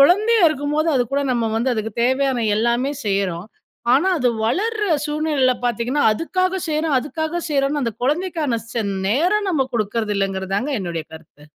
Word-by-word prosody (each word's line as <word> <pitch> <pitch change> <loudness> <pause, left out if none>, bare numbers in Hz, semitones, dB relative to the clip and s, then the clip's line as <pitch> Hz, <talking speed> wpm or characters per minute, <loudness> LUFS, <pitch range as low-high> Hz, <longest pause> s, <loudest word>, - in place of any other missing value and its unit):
குழந்தையா 420 +9 +5
இருக்கும்போது 295 +2 -1
அதுகூட 260 +3 0
நம்ம 235 -2 0
வந்து, 235 +3 0
அதுக்கு 220 0 -3
தேவையான 260 -1 +1
எல்லாமே 235 +5 +1
செய்றோம். 195 -3 -1 0.5
ஆனா, 290 +9 +4
அது 250 -3 +2 0.2
வளர்ற 430 - 0 0.2
சூழ்நிலையில 295 -4 +1
பாத்தீங்கன்னா, 245 +5 0
அதுக்காக 370 - -1
செய்றோம், 310 -2 +1
அதுக்காக 315 +5 -3
செய்கிறோன்னு 280 0 +1
அந்த 230 -2 -1
குழந்தைக்கான 305 -4 0
செ 230 - -1 0.3
நேரம் 365 - +2
நம்ம 275 -7 +1
கொடுக்குறது 215 -1 -1
இல்லங்குறதாங்க 195 +5 -1
என்னுடைய 170 -3 -4
கருத்து. 155 -2 -15
270 Hz, 140 wpm, -21 LUFS, 225-315 Hz, 0.5 s, குழந்தையா